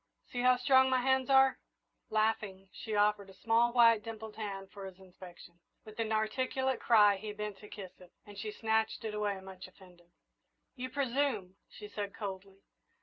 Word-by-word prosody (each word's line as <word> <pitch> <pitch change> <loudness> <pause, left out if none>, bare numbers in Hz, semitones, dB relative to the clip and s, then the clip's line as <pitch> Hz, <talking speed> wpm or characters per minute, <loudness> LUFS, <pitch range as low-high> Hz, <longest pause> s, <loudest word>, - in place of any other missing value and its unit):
See 245 - -2
how 250 0 +5
strong 260 0 +4
my 260 -1 +2
hands 265 0 +1
are!" 265 0 +5 0.5
Laughing, 215 -3 -1
she 220 -2 -5
offered 205 -1 +2
a 190 - -14
small, 230 +3 +2
white, 230 -2 +5
dimpled 220 -1 -8
hand 195 -3 -6
for 195 -1 -8
his 185 -1 -12
inspection. 180 -2 -14 0.3
With 215 +1 -12
an 225 - 0
inarticulate 255 +4 -1
cry 210 -4 +5
he 210 +2 -6
bent 210 -1 -6
to 210 - -13
kiss 190 -3 -8
it, 180 -1 -16
and 205 -1 -12
she 215 +2 -5
snatched 220 +1 -1
it 215 - -3
away, 205 -2 -2
much 190 -1 -10
offended. 180 -2 -19 0.7
"You 255 0 -5
presume," 260 -9 -1
she 210 - -10
said, 205 -1 -6
coldly. 195 -1 -7
210 Hz, 175 wpm, -32 LUFS, 195-235 Hz, 0.7 s, how